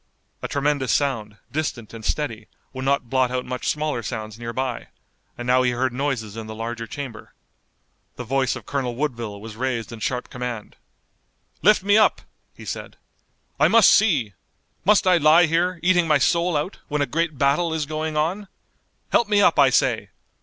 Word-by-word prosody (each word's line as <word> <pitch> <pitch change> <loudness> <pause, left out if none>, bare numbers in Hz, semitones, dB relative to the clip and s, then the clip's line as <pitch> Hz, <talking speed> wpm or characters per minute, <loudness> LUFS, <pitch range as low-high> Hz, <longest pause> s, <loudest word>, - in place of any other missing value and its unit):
A - - -3
tremendous 140 -2 0
sound, 110 -7 -1
distant 135 -7 -3
and 115 -1 -9
steady, 115 -5 -3 0.3
would 130 0 -5
not 140 -2 +1
blot 130 -1 +2
out 125 0 -3
much 125 0 -5
smaller 150 -5 -1
sounds 110 +1 -6
nearby, 120 +1 -4 0.5
and 120 - -6
now 125 +1 +4
he 125 - +2
heard 130 +1 -1
noises 125 -6 -2
in 110 -1 -7
the 110 - -7
larger 115 +1 -5
chamber. 130 -3 -8 0.8
The 125 - -6
voice 130 0 0
of - - -9
Colonel 130 -4 -2
Woodville 120 -7 -3
was 110 +1 -9
raised 120 -2 -3
in 115 - -8
sharp 125 +3 -3
command. 125 -4 -6 0.9
"Lift 210 -1 +4
me 205 +2 +5
up!" 215 - +3 0.3
he - - -12
said, - - -6 0.6
"I - - +6
must 230 -2 +6
see! 150 - +3 0.5
Must 205 0 +4
I 180 -1 +5
lie 160 +2 +6
here, 170 +2 0
eating 175 -2 +3
my 150 -2 +4
soul 170 +4 +2
out, 150 +7 -4
when 150 -1 0
a - - +1
great 160 0 -2
battle 145 +5 +2
is 160 -2 -1
going 155 +1 -3
on! 180 +7 -1 0.6
Help 235 - +3
me 205 -1 +4
up, 175 -6 +4
I 140 -2 +7
say! - - +1
135 Hz, 180 wpm, -23 LUFS, 120-160 Hz, 0.9 s, I